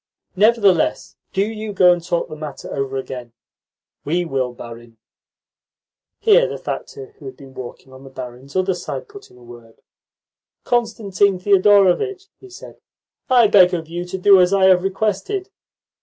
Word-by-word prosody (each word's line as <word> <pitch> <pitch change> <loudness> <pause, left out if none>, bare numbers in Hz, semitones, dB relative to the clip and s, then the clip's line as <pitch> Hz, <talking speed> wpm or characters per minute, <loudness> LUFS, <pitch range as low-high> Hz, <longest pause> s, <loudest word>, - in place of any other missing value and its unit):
'" - - -66
"Nevertheless, 205 -4 +2 0.2
do 195 +1 0
you 215 -1 -6
go 180 -2 +5
and 175 -1 -5
talk 170 0 -2
the - - -9
matter 150 -2 -8
over 135 -1 -3
again." 125 -3 -7 0.7
"We 175 +4 -1
will, 130 -5 -2
barin." 120 -1 -12 1.2
Here 470 +3 +4
the - - -6
factor 420 0 -7
who - - -13
had 390 - -10
been 135 -1 -14
walking 130 +1 -10
on 130 +1 -14
the 135 - -12
barin's 130 +1 -10
other 185 0 +1
side 180 - -6
put 410 -1 -14
in - - -20
a 125 - -18
word. 120 -1 -15 0.8
"Constantine 205 -5 0
Thedorovitch," 205 - +2
he 390 - -15
said, 370 - -13 0.5
"I 245 -3 +5
beg 190 -4 +5
of 165 -2 -6
you 175 +2 -5
to 180 +1 -6
do 190 0 +6
as 180 +2 +3
I 195 - +2
have 180 -1 +4
requested." 215 - -2
185 Hz, 165 wpm, -19 LUFS, 135-215 Hz, 1.2 s, do